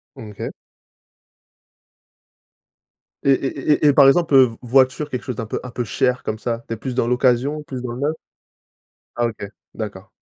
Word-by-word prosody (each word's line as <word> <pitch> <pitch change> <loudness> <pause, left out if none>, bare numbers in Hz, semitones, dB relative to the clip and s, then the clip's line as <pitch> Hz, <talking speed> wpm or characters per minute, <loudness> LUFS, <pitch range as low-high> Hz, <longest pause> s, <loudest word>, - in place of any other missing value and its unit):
Mmh, 110 -2 -9
OK. 100 - -5 2.7
Et 140 - +4
et 135 +2 0
et - - +7
et 145 - +6
par 140 -1 +7
exemple, 160 +2 +3
heu, 135 -1 +8
v 115 - -9
voiture 130 +4 +2
quelque 125 -3 -4
chose 125 - -4
d'un 115 - -4
peu 110 - -4
un 125 - -8
peu 120 - -3
cher 125 +3 0
comme 110 - -3
ça, 115 0 -3
tu - - -3
es - - -5
plus 125 +3 -5
dans 115 - +1
l'occasion, 125 +4 +1
plus 130 -4 -6
dans 125 -1 -5
le 120 - -7
neuf? 150 +3 0 1.0
Ah 120 0 +1
OK, 105 -3 -6 0.3
d'accord. 105 -2 -7
125 Hz, 185 wpm, -21 LUFS, 115-135 Hz, 2.7 s, heu